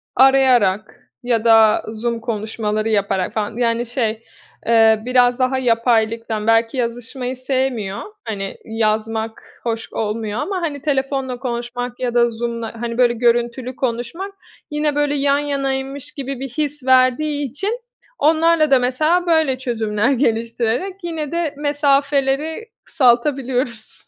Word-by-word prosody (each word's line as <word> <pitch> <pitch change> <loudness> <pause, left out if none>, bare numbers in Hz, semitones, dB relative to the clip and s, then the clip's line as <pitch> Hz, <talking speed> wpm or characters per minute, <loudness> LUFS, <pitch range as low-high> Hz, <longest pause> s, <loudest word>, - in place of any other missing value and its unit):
arayarak 250 -7 +4 0.2
ya 235 -2 0
da 225 -1 +5
Zoom 230 +1 -3
konuşmaları 215 -1 -2
yaparak 200 -3 0
falan 215 +1 -3
yani, 235 0 +1
şey, 230 -2 -2 0.4
eee, 225 -1 +5
biraz 250 0 +3
daha 255 +1 +1
yapaylıktan. 230 -2 +1
Belki 225 +2 +3
yazışmayı 245 +2 -3
sevmiyor, 255 -6 -2 0.2
hani, 195 -3 -4
yazmak 220 0 -2
hoş 225 -1 -4
olmuyor 215 0 -2
ama, 380 +2 -2
hani, 290 -5 -3
telefonla 270 -3 -1
konuşmak 245 0 -4
ya 245 -2 -2
da 240 0 +4
Zoom'la, 230 0 -5
hani, 235 0 -3
böyle, 245 -1 +4
görüntülü 240 +2 0
konuşmak 255 +11 -3 0.4
yine, 300 -1 0
böyle, 290 0 +1
yan 280 0 +2
yanaymış 275 -1 -3
gibi 275 -2 -5
bir 270 0 -5
his 290 +1 -3
verdiği 265 +3 +3
için 405 - -2 0.4
onlarla 315 -1 +3
da 265 - +6
mesela 305 +8 +1
böyle 315 -6 +2
çözümler 225 -1 0
geliştirerek 235 - -1
yine 320 -4 -4
de 335 -3 -1
mesafeleri 290 +5 +1
kısaltabiliyoruz. 245 - 0
245 Hz, 125 wpm, -19 LUFS, 225-280 Hz, 0.4 s, da